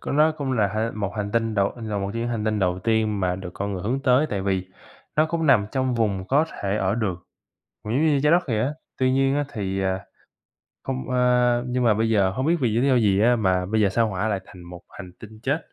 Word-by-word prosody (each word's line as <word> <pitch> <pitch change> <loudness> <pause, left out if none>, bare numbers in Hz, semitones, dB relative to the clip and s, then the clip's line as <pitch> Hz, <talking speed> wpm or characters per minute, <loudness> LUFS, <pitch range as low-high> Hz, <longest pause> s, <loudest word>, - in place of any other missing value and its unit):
có - - -4
nó 155 +2 +4
cũng 140 -3 -3
là 110 -5 +2
hệ 110 +1 0
một 100 -2 -4
hành 100 -1 -3
tinh 115 -1 0
đầu 100 -1 +1
là 110 -3 -4
một 100 0 -3
trong 115 - -3
những 120 - -2
hành 115 -3 -2
tinh 110 -1 0
đầu 90 -2 0
tiên 110 -1 0
mà 90 -1 0
được 90 -1 -7
con 100 +1 -3
người 95 -2 -4
hướng 125 +6 -1
tới 130 +4 +3
tại 100 -2 -2
vì 95 -2 -1 0.5
nó 155 +1 +4
cũng 165 0 -2
nằm 105 -7 +4
trong 130 -1 0
vùng 100 -5 0
có 145 +4 +3 0.2
thể 100 +1 0
ở 95 0 0
được, 110 -5 -1 0.7
cũng 105 +2 -4
giống 150 +5 +2
như 145 -2 +3
Trái 150 - +4
Đất 175 +1 +4
vậy 110 -4 0
á. 130 +6 0 0.3
Tuy 130 0 +2
nhiên 135 +1 +2
á 145 0 0
thì, 95 -3 -2
à, 95 0 -2 0.8
không, 135 -1 -3
a 125 -1 +3
nhưng 125 0 -1
mà 110 - +4
bây 110 +2 0
giờ 100 -4 +3
hông 130 +9 -2
biết 170 +1 +3
vì 125 - +2
lý 135 +3 +2
do 130 - +4
gì 100 -4 +3
á 120 +2 +4
mà 95 -4 +1
bây 110 +3 0
giờ 100 - +4
Sao 115 +4 +1
Hỏa 100 +2 -2
lại 100 -3 -1
thành 90 -2 -13
một 85 0 -10
hành 90 -2 -10
tinh 110 0 -12
chết, 140 +3 0
110 Hz, 265 wpm, -24 LUFS, 100-130 Hz, 0.8 s, nó